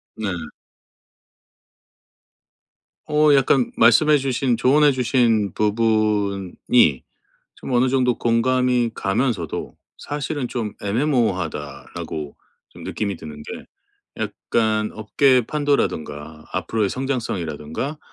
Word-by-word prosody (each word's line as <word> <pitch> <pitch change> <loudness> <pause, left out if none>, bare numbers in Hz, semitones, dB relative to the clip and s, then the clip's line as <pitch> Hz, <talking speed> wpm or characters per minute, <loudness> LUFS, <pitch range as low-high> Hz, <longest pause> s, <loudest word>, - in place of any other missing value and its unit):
네. 110 -2 -3 2.8
어 150 -1 +4
약간 135 -2 +3
말씀해 135 +7 +5
주신 130 -2 0
조언해 140 +4 +4
주신 115 -5 +2
부분이 105 - +1 0.5
좀 130 - -6
어느 125 +1 +3
정도 125 -2 +1
공감이 125 0 +1
가면서도 95 - -2 0.2
사실은 145 -2 -4
좀 115 -4 -3
'애매모호하다.'라고 95 - -2 0.3
좀 - - -13
느낌이 100 -2 -3
드는 75 -1 -9
게 - - -8 0.5
약간 110 -2 -1
업계의 125 +4 +3
판도라든가 80 - -2
앞으로의 110 -3 0
성장성이라든가 115 - -3
115 Hz, 230 characters per minute, -21 LUFS, 100-130 Hz, 2.8 s, 말씀해